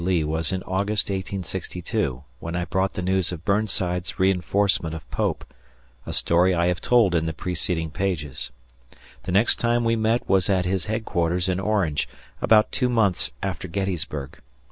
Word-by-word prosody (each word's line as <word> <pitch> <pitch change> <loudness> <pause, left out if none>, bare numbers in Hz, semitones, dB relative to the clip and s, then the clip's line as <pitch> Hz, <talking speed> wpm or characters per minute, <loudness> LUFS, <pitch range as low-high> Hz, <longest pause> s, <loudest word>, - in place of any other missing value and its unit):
Lee 90 -3 +2
was 80 +1 -1
in 95 -1 -2
August, 100 +3 0
1862, 90 -8 -3 0.2
when 85 +1 -5
I 90 0 -1
brought 95 +2 0
the 90 - -3
news 95 -1 +1
of 85 -2 -7
Burnside's 100 -4 0
reinforcement 95 -2 +2
of 80 -1 -9
Pope, - - -1 0.6
a - - -3
story 90 +2 +3
I 85 0 +2
have 90 - -1
told 115 -7 +4
in 80 -1 +1
the 80 - -2
preceding 85 -2 -2
pages. 75 -7 -2 0.8
The 90 - -2
next 100 +5 +4
time 120 0 +2
we 115 0 +2
met 115 +2 +1
was 95 -1 +3
at 95 -2 +2
his 95 0 0
headquarters 90 -5 0
in 95 0 0
Orange, 95 -11 0 0.3
about 110 -1 +5
two 125 -2 +1
months 110 -6 +2
after 95 -2 -3
Gettysburg. 85 -6 -3
95 Hz, 165 wpm, -24 LUFS, 85-100 Hz, 0.8 s, about